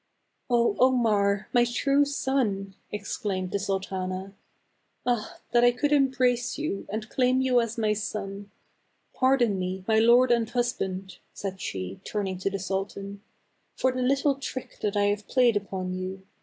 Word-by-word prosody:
" - - -19
0, 235 -1 +3
Omar! 215 -6 +3
my 240 - +5
true 275 +4 +2
son! 250 -9 -1
" - - -41
exclaimed 200 -2 -3
the 200 - 0
sul 195 0 0
tana. 190 0 -5 0.4
" - - -46
Ah! 240 -3 -1
that 240 0 +4
I 245 - +8
could 250 +4 0
embrace 255 -3 +2
you, 300 -10 -3
and 215 +1 -4
claim 255 +2 +2
you 255 -2 +3
as 230 0 -4
my 215 -2 +2
son. 205 -1 -5 0.6
Pardon 250 -6 +2
me, 185 +1 -3
my 220 -1 +4
lord 240 +2 +6
and 230 -2 +2
hus 245 0 0
band," 190 0 -5
said 190 -1 -5
she, 95 0 -5
turning 195 -3 -3
to 195 - 0
the 195 - -3
sultan, 195 +1 -4 0.3
" - - -45
for 260 - +2
the 255 0 -3
little 275 +3 +2
trick 270 -1 -7
that 205 0 -1
I 205 - +3
have 205 0 0
played 245 -3 +4
upon 190 -2 -3
you. 185 +1 -5
215 Hz, 175 wpm, -27 LUFS, 195-250 Hz, 0.6 s, I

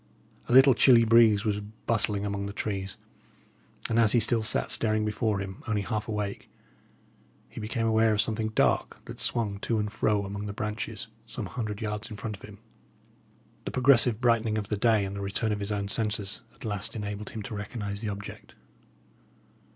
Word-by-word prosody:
A - - -2
little 130 +2 +8
chilly 120 -1 +6
breeze 110 -2 +5
was 105 -1 0
bustling 105 -1 -2
among 100 -1 -3
the 100 - -6
trees, 100 -2 -4 0.9
and 115 - +1
as 110 -2 +5
he 120 - +5
still 115 +1 +2
sat 110 - +1
staring 110 -1 +2
before 105 0 0
him, 95 -1 -6
only 105 -2 0
half 105 +3 -3
awake, 105 -2 -4 1.0
he - - -10
became 115 +2 -2
aware 110 0 +3
of 105 - 0
something 110 0 0
dark 110 - +1
that - - -9
swung 105 -4 -1
to 115 +2 -1
and 105 -1 -2
fro 105 -2 +1
among 100 +1 -5
the 100 - -4
branches, 105 0 -4 0.2
some - - -5
hundred 110 -4 -4
yards 105 0 -3
in 105 - -8
front 110 0 -5
of 95 - -18
him. 105 -1 -11 1.1
The - - -2
progressive 125 -3 +4
brightening 115 -3 +2
of 105 -1 -4
the 105 - 0
day 110 -1 +3
and 100 0 -5
the 100 - -5
return 100 +3 -1
of 105 - -1
his 100 +1 -4
own 100 -1 -2
senses 105 0 -2
at - - -11
last 105 -1 -2
enabled 105 -1 -5
him 110 - -6
to 105 - -7
recognise 100 -1 -5
the 110 - -2
object. 100 0 -8
105 Hz, 190 wpm, -28 LUFS, 100-115 Hz, 1.1 s, little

